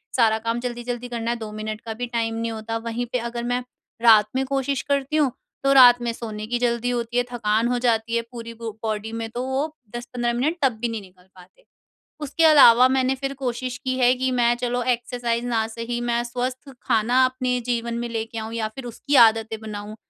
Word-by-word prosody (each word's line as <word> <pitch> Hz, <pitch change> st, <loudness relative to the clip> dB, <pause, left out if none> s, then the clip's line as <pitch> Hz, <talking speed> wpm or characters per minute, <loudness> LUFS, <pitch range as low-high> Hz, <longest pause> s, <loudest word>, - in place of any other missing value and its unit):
सारा 220 Hz, -3 st, +4 dB
काम 230 Hz, +1 st, -2 dB
जल्दी-जल्दी 240 Hz, 0 st, -4 dB
करना 235 Hz, -1 st, -2 dB
हैं। 240 Hz, -, -3 dB
2 215 Hz, -1 st, -6 dB
मिनट 215 Hz, 0 st, -5 dB
का 225 Hz, -1 st, -6 dB
भी 245 Hz, +2 st, -4 dB
टाइम 230 Hz, -1 st, -2 dB
नहीं 230 Hz, 0 st, -2 dB
होता। 225 Hz, +1 st, -4 dB
वहीं 230 Hz, +1 st, -4 dB
पर 250 Hz, -, +1 dB
अगर 235 Hz, 0 st, -5 dB
मैं 245 Hz, +1 st, -1 dB, 0.4 s
रात 215 Hz, -3 st, +7 dB
में 265 Hz, -, +1 dB
कोशिश 275 Hz, 0 st, -1 dB
करती 280 Hz, +1 st, 0 dB
हूँ। 285 Hz, -5 st, +3 dB, 0.3 s
तो 275 Hz, -, +3 dB
रात 245 Hz, -2 st, +8 dB
में 235 Hz, -, -1 dB
सोने 215 Hz, -2 st, -6 dB
की 240 Hz, +1 st, -1 dB
जल्दी 240 Hz, 0 st, 0 dB
होती 240 Hz, 0 st, -2 dB
है, 245 Hz, -, +3 dB
थकान 225 Hz, 0 st, +1 dB
हो 245 Hz, 0 st, 0 dB
जाती 230 Hz, 0 st, +1 dB
है, 235 Hz, -, +2 dB
पूरी 230 Hz, -1 st, -8 dB
बु 230 Hz, -1 st, -6 dB
बॉडी 220 Hz, 0 st, -3 dB
में। 225 Hz, 0 st, -4 dB
तो 245 Hz, +2 st, -4 dB
वो 280 Hz, +4 st, -2 dB, 0.2 s
10-15 240 Hz, 0 st, -2 dB
मिनट 295 Hz, +8 st, 0 dB
तब 265 Hz, -4 st, +3 dB
भी 240 Hz, -, +1 dB
नहीं 225 Hz, -2 st, -4 dB
निकल 185 Hz, -1 st, -19 dB
पाते। 185 Hz, -, -19 dB, 0.6 s
उसके 300 Hz, +3 st, 0 dB
अलावा 255 Hz, -6 st, +8 dB
मैंने 260 Hz, 0 st, +1 dB
फिर 275 Hz, +1 st, -4 dB
कोशिश 255 Hz, -1 st, -3 dB
की 255 Hz, 0 st, -1 dB
हैं 250 Hz, 0 st, +4 dB
कि 260 Hz, 0 st, 0 dB
मैं 240 Hz, -1 st, +3 dB
चलो 245 Hz, 0 st, -2 dB
एक्सरसाइज़ 240 Hz, -1 st, -1 dB
ना 225 Hz, -2 st, 0 dB
सही, 230 Hz, +1 st, -4 dB
मैं 240 Hz, 0 st, 0 dB
स्वस्थ 255 Hz, +3 st, -4 dB
खाना 245 Hz, +2 st, +3 dB
अपने 255 Hz, -1 st, 0 dB
जीवन 235 Hz, -1 st, -1 dB
में 240 Hz, 0 st, -3 dB
लेके 225 Hz, 0 st, -4 dB
आऊँ 220 Hz, +1 st, -5 dB
या 220 Hz, -2 st, -1 dB
फिर 250 Hz, +4 st, -10 dB
उसकी 280 Hz, +5 st, -4 dB
आदतें 220 Hz, 0 st, -4 dB
बनाऊँ। 215 Hz, 0 st, -7 dB
240 Hz, 215 wpm, -23 LUFS, 225-250 Hz, 0.6 s, रात